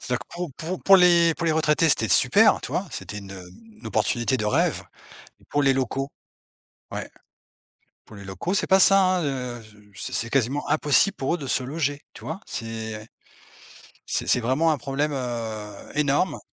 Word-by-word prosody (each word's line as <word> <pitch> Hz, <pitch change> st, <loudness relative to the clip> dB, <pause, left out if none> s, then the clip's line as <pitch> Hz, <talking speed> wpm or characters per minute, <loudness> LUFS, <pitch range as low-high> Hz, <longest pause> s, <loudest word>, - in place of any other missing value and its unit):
C'est-à-dire 125 Hz, 0 st, -3 dB
que -, -, -11 dB
pour 175 Hz, -4 st, -5 dB
pour 175 Hz, +3 st, -5 dB
pour 195 Hz, 0 st, +7 dB
les 170 Hz, -2 st, +5 dB
pour 170 Hz, -, -3 dB
les 160 Hz, -, +3 dB
retraités, 155 Hz, +1 st, +2 dB
c'était 115 Hz, -6 st, +2 dB
super, -, -, +4 dB
tu -, -, -6 dB
vois? -, -, -1 dB
C'était 105 Hz, -, -7 dB
une, 100 Hz, -1 st, -10 dB
heu, 90 Hz, -2 st, -10 dB, 0.3 s
une -, -, -10 dB
opportunité 120 Hz, +1 st, 0 dB
de 110 Hz, -, -3 dB
rêve! 105 Hz, -, +1 dB, 0.6 s
Et -, -, -24 dB
pour 145 Hz, -, +1 dB
les 135 Hz, -1 st, +4 dB
locaux? 135 Hz, +1 st, -2 dB, 0.8 s
Ouais. -, -, -5 dB, 1.0 s
Pour 110 Hz, -, -14 dB
les 100 Hz, -, -10 dB
locaux, 95 Hz, -, -4 dB
c'est -, -, +1 dB
pas 190 Hz, 0 st, +4 dB
ça, 195 Hz, +1 st, +7 dB, 0.2 s
hein, 170 Hz, -, -2 dB
heu, 125 Hz, -4 st, -4 dB
je 105 Hz, -1 st, -18 dB, 0.2 s
c'est -, -, -3 dB
c'est 115 Hz, -, 0 dB
quasiment 135 Hz, +3 st, 0 dB
impossible 155 Hz, +6 st, +3 dB
pour 135 Hz, +5 st, -1 dB
eux -, -, -3 dB
de 140 Hz, -, -7 dB
se 130 Hz, -, 0 dB
loger, 145 Hz, +1 st, -3 dB
tu -, -, -14 dB
vois? 160 Hz, +5 st, -5 dB
C'est, 115 Hz, -1 st, -5 dB
heu, 110 Hz, -, -15 dB, 1.0 s
c'est -, -, -2 dB
c'est -, -, +3 dB
vraiment 130 Hz, +7 st, +1 dB
un 155 Hz, -, 0 dB
problème, 140 Hz, +3 st, -2 dB
heu, 110 Hz, -5 st, -5 dB
énorme. 150 Hz, +5 st, +1 dB
135 Hz, 195 wpm, -24 LUFS, 115-160 Hz, 1.0 s, pour